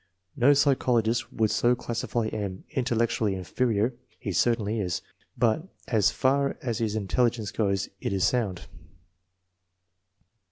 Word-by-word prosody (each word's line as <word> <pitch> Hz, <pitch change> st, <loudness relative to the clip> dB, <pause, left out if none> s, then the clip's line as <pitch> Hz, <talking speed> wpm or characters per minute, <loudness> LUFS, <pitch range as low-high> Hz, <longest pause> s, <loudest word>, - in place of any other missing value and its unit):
No 135 Hz, +4 st, +5 dB
psychologist 125 Hz, -5 st, +2 dB
would 110 Hz, -2 st, +1 dB
so 120 Hz, +1 st, +3 dB
classify 120 Hz, -1 st, -2 dB
M. 100 Hz, -3 st, -4 dB
Intellectually 115 Hz, -6 st, 0 dB
inferior 110 Hz, +5 st, 0 dB, 0.3 s
he 110 Hz, -5 st, -4 dB
certainly 115 Hz, 0 st, +1 dB
is, 90 Hz, -4 st, -2 dB, 0.3 s
but 120 Hz, +9 st, +1 dB, 0.2 s
as 110 Hz, -4 st, +3 dB
far 140 Hz, +3 st, +1 dB
as 120 Hz, -2 st, -3 dB
his 110 Hz, -2 st, -1 dB
intelli 115 Hz, +4 st, +2 dB
gence 110 Hz, -3 st, -7 dB
goes, 100 Hz, -3 st, 0 dB
it -, -, -3 dB
is 95 Hz, -2 st, 0 dB
sound. 100 Hz, -6 st, 0 dB
115 Hz, 125 wpm, -27 LUFS, 105-125 Hz, 0.3 s, No